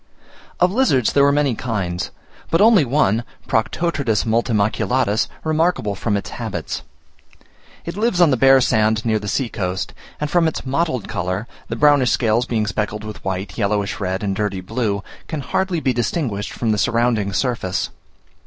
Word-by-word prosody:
Of 180 +1 +4
lizards 195 - +2
there 140 - +5
were 140 - +5
many 145 -2 +2
kinds, 95 -7 -3 0.4
but 165 - +2
only 210 -4 +6
one 120 -4 +2 0.2
(Proctotretus 125 -1 0
multimaculatus) 110 0 +1 0.2
remarkable 155 - +1
from 105 +1 -1
its 100 - -6
habits. - - -4 1.0
It 170 - -5
lives 210 -3 +1
on 170 -4 +6
the - - +4
bare 135 +1 +6
sand 110 -1 +2
near 110 -2 +2
the 105 - -7
sea 130 +5 0
coast, 95 -4 -3 0.3
and 150 - -1
from 165 +2 +3
its 160 - -3
mottled 135 - -1
colour, 90 +4 -2 0.2
the - - -3
brownish 145 -4 +4
scales 115 +1 +2
being 110 -3 0
speckled 105 +1 -2
with 105 -1 -8
white, 95 +4 -4
yellowish 100 -1 0
red, 95 0 -2
and 100 -1 -1
dirty 105 -2 -1
blue, 100 +1 -2 0.2
can 155 -3 -4
hardly 185 +5 -1
be 130 -4 +1
distinguished 120 -3 -2
from 115 -2 -1
the 105 - +1
surrounding 115 -1 +1
surface. 95 -4 -1
115 Hz, 160 wpm, -20 LUFS, 105-145 Hz, 1.0 s, only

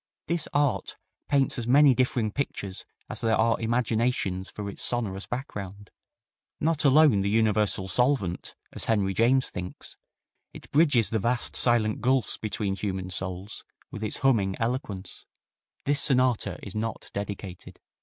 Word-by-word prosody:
This 170 -2 -1
art 145 -2 0 0.3
paints 135 -3 +2
as 115 - -4
many 140 +2 +6
differing 125 -3 0
pictures 100 -7 -4 0.2
as - - -5
there 115 -1 +2
are 115 +1 +2
imaginations 115 -4 0
for 105 -1 -6
its 100 - -6
sonorous 100 -5 -2
background; 100 -6 -6 0.7
not 160 -1 0
alone 140 -6 +5
the 100 - 0
universal 105 -3 +1
solvent, 125 -6 0 0.2
as - - -3
Henry 100 -4 +1
James 125 +5 +2
thinks, 90 0 -8 0.6
it - - -13
bridges 140 - +3
the 110 - +1
vast, 120 +4 0
silent 115 -3 +2
gulfs 130 +1 +2
between 105 -2 -2
human 95 -2 -4
souls 95 +3 -4 0.3
with 105 - -6
its 110 - -1
humming 110 -9 +2
eloquence. 115 -5 -4 0.6
This 145 0 +2
sonata 130 -5 +2
is 100 - -7
not 110 +1 -4
dedicated. 100 -3 -7
110 Hz, 140 wpm, -27 LUFS, 100-130 Hz, 0.7 s, many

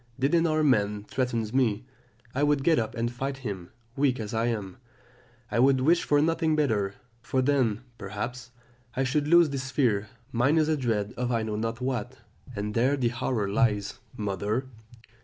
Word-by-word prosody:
Did 135 +4 +1
an 170 0 +4
armed 155 -1 +2
man 105 -2 +1
threaten 120 -1 -1
me, 125 -3 +1 0.5
I 135 - -1
would 145 -1 +2
get 160 +1 +4
up 110 +1 -3
and 120 0 -1
fight 135 +2 -3
him; 95 -5 -5 0.3
weak 135 -3 +1
as 105 -1 -5
I 115 +1 +1
am, 105 -6 -3 0.7
I 115 - +1
would 135 +1 +5
wish 165 +7 +3
for 145 - +3
nothing 160 -1 +1
better, 105 -10 +1 0.3
for 130 - -1
then, 125 -6 +2 0.2
perhaps, 115 +5 -5 0.5
I 135 - +1
should 145 +3 0
lose 170 -2 +6
this 135 -1 -3
fear; 110 -8 +1 0.2
mine 130 +7 +2
is 155 -1 +3
a 155 - +3
dread 115 -6 -1
of 125 0 -1
I 115 -2 +1
know 110 -1 -3
not 115 +2 -3
what, 125 -1 -2 0.4
and 105 +1 -3
there 130 +5 +2
the 120 -3 +1
horror 120 -3 -1
lies. 105 -2 +1 0.2
"Mother. 105 +4 -1
125 Hz, 180 wpm, -27 LUFS, 105-140 Hz, 0.7 s, lose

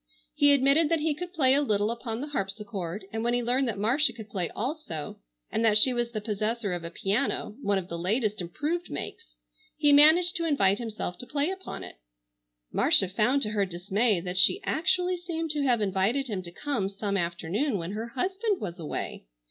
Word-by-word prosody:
He 290 -1 +5
admitted 280 +3 +4
that 330 -2 +1
he 310 0 +1
could 350 +4 -7
play 270 -7 +3
a 285 - +4
little 210 -5 +1
upon 235 0 -4
the 295 - -5
harpsichord, 195 - -4
and, 225 0 -2
when 240 +1 +1
he 245 - 0
learned 250 +3 +1
that 225 - -2
Marcia 240 +6 +2
could 220 -2 -10
play 180 -4 -2
also 235 - -5 0.3
and 225 - 0
that 215 -2 +5
she 250 +4 +5
was 240 -1 -1
the 230 -2 -4
possessor 215 0 -2
of 175 -1 -4
a 170 - -5
piano, 205 +5 -1
one 205 -5 +1
of 185 -2 -4
the 170 -2 -5
latest 210 +3 0
improved 305 - -3
makes, 460 - -7 0.4
he 295 -1 +4
managed 320 +5 +6
to 335 - -2
invite 200 -10 +3
himself 215 -6 -5
to 245 - -8
play 290 +4 0
upon 380 0 -7
it. - - -10 0.7
Marcia 190 - +4
found 240 +9 +2
to 210 - 0
her 205 -2 +1
dismay 195 +3 +1
that 180 +1 -2
she 375 - +5
actually 360 +2 +1
seemed 330 -2 -3
to 300 -1 -2
have 245 -5 +2
invited 200 +7 +1
him 210 -7 -3
to 170 -1 -10
come 205 -2 -2
some 200 0 -3
afternoon 180 - -1
when 170 +1 -5
her 220 +3 -4
husband 380 - -1
was 180 -3 -6
away. 150 - -5
230 Hz, 205 wpm, -27 LUFS, 195-290 Hz, 0.7 s, managed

